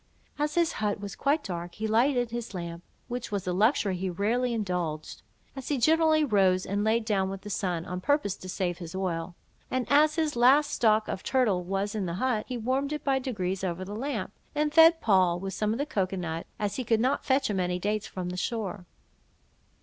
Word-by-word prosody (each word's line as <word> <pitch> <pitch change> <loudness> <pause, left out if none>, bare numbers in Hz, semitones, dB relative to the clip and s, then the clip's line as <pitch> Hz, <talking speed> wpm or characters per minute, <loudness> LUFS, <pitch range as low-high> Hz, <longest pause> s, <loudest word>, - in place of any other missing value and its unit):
As 295 0 0
his 340 -1 +3
hut 210 -2 -2
was 200 -1 -6
quite 290 +2 +1
dark, 175 -2 -5
he 220 - -4
lighted 245 +2 +2
his 235 -4 -5
lamp, 170 -1 -5 0.3
which 245 -2 -5
was 200 -3 -2
a 180 - -1
luxury 205 0 +2
he 185 +1 -2
rarely 225 +7 0
indulged 180 -8 -3 0.3
(as 270 -2 -7
he 290 - 0
generally 315 +3 +4
rose 190 -6 +3
and 205 +2 -1
laid 220 +1 +1
down 195 -3 +1
with 195 0 -6
the 210 - -7
sun, 175 -4 -2
on 180 +1 -5
purpose 285 -4 +1
to 185 - -9
save 180 -1 -2
his 170 0 -8
oil); 175 -2 -3 0.3
and 255 -1 -1
as 300 +1 +5
his 315 -2 0
last 270 +5 +5
stock 215 -2 +3
of 190 - -4
turtle 230 -9 +1
was 195 +3 -2
in 205 -4 -2
the 170 - -3
hut, 220 +1 0
he 250 - -3
warmed 260 +5 -1
it 300 - -3
by 270 -1 +2
degrees 195 -8 -3
over 185 0 -2
the 205 +2 -6
lamp, 225 -5 -3 0.2
and 300 0 0
fed 325 0 +7
Poll 185 -5 +3
with 195 +1 -5
some 215 +4 0
cocoa 200 -9 -1
nut, 165 -2 -4
as 205 -1 -2
he 255 - -1
could 225 -1 +2
not 255 +4 +1
fetch 265 +1 +2
him 200 -3 -1
any 180 0 0
dates 210 +3 -2
from 180 -1 -5
the 180 - -5
shore. 200 -3 -3
210 Hz, 210 wpm, -28 LUFS, 185-255 Hz, 0.3 s, fed